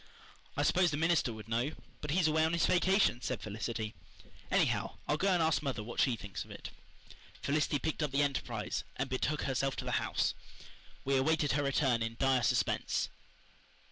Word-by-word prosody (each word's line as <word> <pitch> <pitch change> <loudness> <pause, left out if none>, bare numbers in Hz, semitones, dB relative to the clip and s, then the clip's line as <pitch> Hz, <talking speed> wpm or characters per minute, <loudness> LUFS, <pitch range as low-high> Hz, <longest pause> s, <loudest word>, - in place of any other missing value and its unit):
"I - - +2
suppose 180 -1 +4
the 145 - -2
minister 165 -5 +2
would 110 -1 -9
know, 120 +6 0 0.3
but 150 - -5
he's 165 +2 +3
away 155 0 +3
on 160 +1 +1
his 170 - +3
vacation" 185 - +3
said 130 -3 -2
Felicity. 110 +1 -4 0.6
"Anyhow, - - +1
I'll 150 - +2
go 185 +6 0
and 180 -4 +3
ask 160 -1 +2
mother 135 -7 -2
what 120 +2 -6
she 130 -4 +3
thinks 100 -5 -6
of - - -18
it." - - -8 0.7
Felicity 150 +1 +1
picked 160 +2 -2
up 150 - +1
the 140 +2 +2
Enterprise 120 -6 -2
and 135 +1 -3
betook 145 +3 0
herself 135 0 0
to - - -5
the - - +1
house. - - 0 0.7
We 135 0 +2
awaited 150 +2 +2
her 145 - +1
return 135 -4 +2
in 115 0 -2
dire 135 -2 +3
suspense. - - +1
140 Hz, 185 wpm, -33 LUFS, 120-155 Hz, 0.7 s, suppose